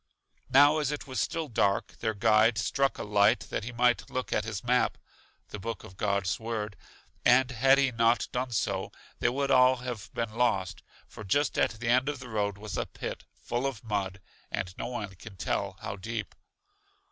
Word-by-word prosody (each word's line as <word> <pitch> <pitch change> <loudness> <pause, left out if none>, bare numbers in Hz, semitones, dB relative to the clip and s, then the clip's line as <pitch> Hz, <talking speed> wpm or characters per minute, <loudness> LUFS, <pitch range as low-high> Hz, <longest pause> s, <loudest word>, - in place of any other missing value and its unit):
Now 145 +4 +6
as 150 -2 0
it 150 - -4
was 130 -5 -2
still 165 -1 -2
dark, 100 -5 0
their 110 -2 -1
guide 110 +2 +4
struck 135 +7 +1
a - - -4
light 100 -1 +3
that - - -2
he 120 - -5
might 120 0 +2
look 130 0 -3
at 105 - 0
his 110 -3 -4
map 125 +1 +2 0.5
(the 105 - -7
book 115 +4 -5
of 95 - -12
God's 100 -2 0
Word); 110 -3 -4 0.5
and 130 +1 +5
had 135 +3 +5
he 135 -2 +3
not 115 0 +2
done 125 +1 -2
so, 115 - -1 0.3
they - - +3
would 140 +2 -1
all 130 0 +6
have 125 -4 -6
been 115 -2 -2
lost, 110 -6 0 0.3
for 110 - -10
just 140 +9 +1
at - - +2
the 115 0 -2
end 130 +3 +3
of 145 - -3
the 125 -2 -10
road 100 -2 -1
was 105 0 -5
a - - -2
pit, - - -6
full 120 +3 -2
of 130 -5 -5
mud, 100 -3 -2 0.3
and 90 0 -4
no - - -4
one 105 -5 -5
can 105 +1 -11
tell 95 +1 -2
how 100 -2 -5
deep. 110 +1 -5
115 Hz, 195 wpm, -29 LUFS, 105-125 Hz, 0.5 s, Now